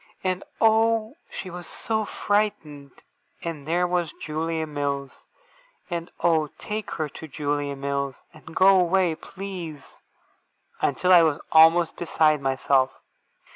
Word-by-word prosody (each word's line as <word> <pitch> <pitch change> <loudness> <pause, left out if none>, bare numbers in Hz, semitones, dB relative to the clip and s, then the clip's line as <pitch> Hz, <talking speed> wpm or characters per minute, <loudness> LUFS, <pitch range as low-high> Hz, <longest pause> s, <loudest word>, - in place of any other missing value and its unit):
And 185 0 -1 0.2
oh, 225 +2 +3
she 185 - -7
was 175 -1 -8
so 220 -1 -2
frightened! 160 -11 -2 0.4
And 155 -4 -5
where 175 +2 +2
was 175 -2 0
Julia 160 +1 -2
Mills! 140 -2 -4 0.6
And 170 0 -3
oh, 160 -3 +3
take 215 0 -5
her 155 -2 -1
to 160 - -10
Julia 145 0 -2
Mills, 140 -1 -2 0.2
and 160 +1 -14
go 190 0 +6
away, 180 -1 +2
please! 180 -4 -8 0.8
until 180 +7 +3
I 175 - +9
was 155 -3 +2
almost 160 +1 +6
beside 155 -3 +2
myself. 135 0 +2
165 Hz, 125 wpm, -25 LUFS, 145-185 Hz, 0.8 s, I